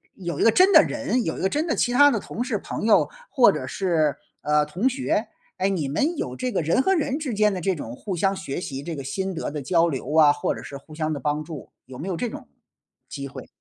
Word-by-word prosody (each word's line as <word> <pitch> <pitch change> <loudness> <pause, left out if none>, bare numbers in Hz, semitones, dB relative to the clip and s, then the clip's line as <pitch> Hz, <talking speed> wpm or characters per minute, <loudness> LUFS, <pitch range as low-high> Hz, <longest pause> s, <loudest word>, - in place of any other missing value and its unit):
有 170 -5 -5
一 - - +2
个 225 - +6
真 370 - +5
的 315 - +10
人， 280 -4 -1
有 160 - -3
一 - - -5
个 190 - +2
真 300 - -1
的 - - 0
其 245 - +1
他 285 +3 +6
的 225 - 0
同 240 - -5
事、 240 -4 -1
朋 210 - -5
友， 225 - +4 0.2
或 - - +5
者 - - -4
是， 165 -6 0 0.3
呃， 150 0 +2
同 180 - -1
学， 245 -4 -1 0.3
哎， 190 +1 +1
你 165 -8 -1
们 300 - 0
有 125 - -3
这 250 - -3
个 190 - 0
人 165 - +2
和 385 - +2
人 290 -5 0
之 285 -7 -3
间 210 -1 +3
的 185 - -3
这 190 +2 +1
种 120 -6 -7
互 190 +6 -5
相 195 +3 +1
学 180 -4 -5
习， 135 -4 -5
这 165 -2 -5
个 140 - -6
心 190 +7 -3
得 - - -3
的 150 0 -5
交 165 +4 +2
流 145 0 -4
啊， 150 -2 +7
或 145 - -1
者 - - -8
是 140 - -8
互 155 +3 -15
相 155 0 -2
的 145 - -4
帮 150 +3 -1
助， 155 -4 -9
有 130 - -11
没 170 - -6
有 185 - -2
这 240 +6 -2
种 - - -9 0.6
机 140 -1 -6
会？ - - -10
180 Hz, 285 characters per minute, -24 LUFS, 150-235 Hz, 0.6 s, 的